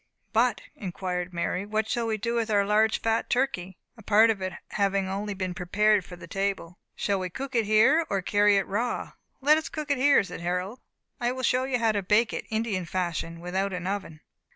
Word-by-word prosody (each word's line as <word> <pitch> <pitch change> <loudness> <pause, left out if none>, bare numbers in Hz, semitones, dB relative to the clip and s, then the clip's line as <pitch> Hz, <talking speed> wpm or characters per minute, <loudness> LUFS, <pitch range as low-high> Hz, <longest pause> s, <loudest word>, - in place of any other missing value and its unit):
"But," 230 -2 +2
inquired 180 -1 -4
Mary, 180 +2 -2
"what 215 +1 -1
shall 235 0 -1
we 220 -1 0
do 230 +3 -2
with 230 -1 0
our 205 -2 +3
large 215 +2 +3
fat 225 0 0
turkey?" 190 -9 -1 0.2
(a 225 - -14
part 220 +2 +5
of 205 -3 -4
it 185 0 -2
only - - -10
having 200 0 -1
been 185 -1 -2
prepared 205 +3 +2
for 180 - -10
the 175 - -11
table); 195 -3 -3 0.2
"shall 200 -1 0
we 185 -1 -3
cook 265 +8 -6
it 230 -4 +1
here, 270 +10 +4
or 195 -2 -1
carry 205 +1 +4
it 195 - +1
raw?" 230 +5 -2 0.3
"Let 300 +3 +5
us 315 - -7
cook 305 -2 -4
it 280 - +1
here," 280 -3 +5
said 180 -3 -8
Harold; 180 +6 -2 0.4
"I 240 -1 0
will 260 0 -5
show 255 +1 +2
you 265 -2 0
how 230 -2 +2
to 205 -1 -1
bake 210 +4 +2
it, - - -4
Indian 220 -5 -1
fashion, 170 -2 -3
without 190 +3 -2
an 180 0 -4
oven." 190 -5 -4
205 Hz, 215 wpm, -27 LUFS, 185-230 Hz, 0.4 s, part